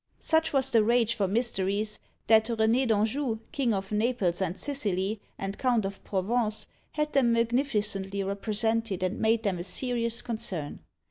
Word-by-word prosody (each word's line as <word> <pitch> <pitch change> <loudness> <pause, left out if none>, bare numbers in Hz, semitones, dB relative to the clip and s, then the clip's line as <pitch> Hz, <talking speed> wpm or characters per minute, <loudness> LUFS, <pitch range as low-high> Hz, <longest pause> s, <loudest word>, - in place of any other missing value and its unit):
Such 320 0 +1
was 270 -1 0
the 225 -2 +5
rage 230 0 +3
for 205 -4 0
Mysteries, 210 -1 -1 0.3
that 220 0 +5
René 230 +2 +2
d'Anjou, 225 +3 +1
king 265 -5 0
of 195 -1 -2
Naples 210 -5 0
and 185 0 -1
Sicily, 205 -7 -2 0.2
and 195 +1 -5
Count 245 -5 +2
of 195 0 -6
Provence, 215 +3 0 0.3
had 300 0 -1
them 245 -4 +4
magnificently 215 -5 0
represented 210 0 0
and 185 +4 -1
made 225 +1 +2
them 195 -5 -1
a - - -3
serious 235 +3 0
concern. 190 -10 -2
220 Hz, 150 wpm, -28 LUFS, 195-240 Hz, 0.3 s, the